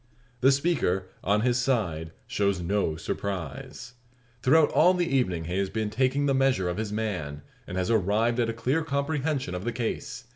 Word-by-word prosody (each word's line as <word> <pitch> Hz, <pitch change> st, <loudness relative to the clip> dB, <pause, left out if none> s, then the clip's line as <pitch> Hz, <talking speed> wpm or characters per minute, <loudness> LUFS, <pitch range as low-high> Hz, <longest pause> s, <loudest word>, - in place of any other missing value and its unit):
The 130 Hz, +3 st, +5 dB
speaker, 135 Hz, -, +1 dB
on 105 Hz, +2 st, +2 dB
his 125 Hz, +1 st, +2 dB
side, 90 Hz, -12 st, 0 dB, 0.2 s
shows 100 Hz, -2 st, 0 dB
no 90 Hz, -2 st, 0 dB
surprise. 95 Hz, -, -5 dB, 0.5 s
Throughout 150 Hz, +5 st, +5 dB
all 180 Hz, +4 st, +5 dB
the 175 Hz, -1 st, +1 dB
evening 120 Hz, -, 0 dB
he 90 Hz, +3 st, -2 dB
has 100 Hz, -1 st, 0 dB
been 110 Hz, -1 st, -2 dB
taking 130 Hz, +4 st, +1 dB
the 140 Hz, -, +2 dB
measure 130 Hz, -8 st, +2 dB
of 90 Hz, +1 st, -2 dB
his 110 Hz, -1 st, -3 dB
man, 90 Hz, -10 st, -3 dB, 0.2 s
and 90 Hz, -, -5 dB
has 90 Hz, +3 st, 0 dB
arrived 110 Hz, +3 st, +2 dB
at 115 Hz, -1 st, +2 dB
a -, -, -1 dB
clear 130 Hz, +8 st, 0 dB
comprehension 140 Hz, -, -1 dB
of 90 Hz, +1 st, -4 dB
the 120 Hz, -, -1 dB
case. 120 Hz, +1 st, -4 dB
110 Hz, 180 wpm, -27 LUFS, 95-135 Hz, 0.5 s, The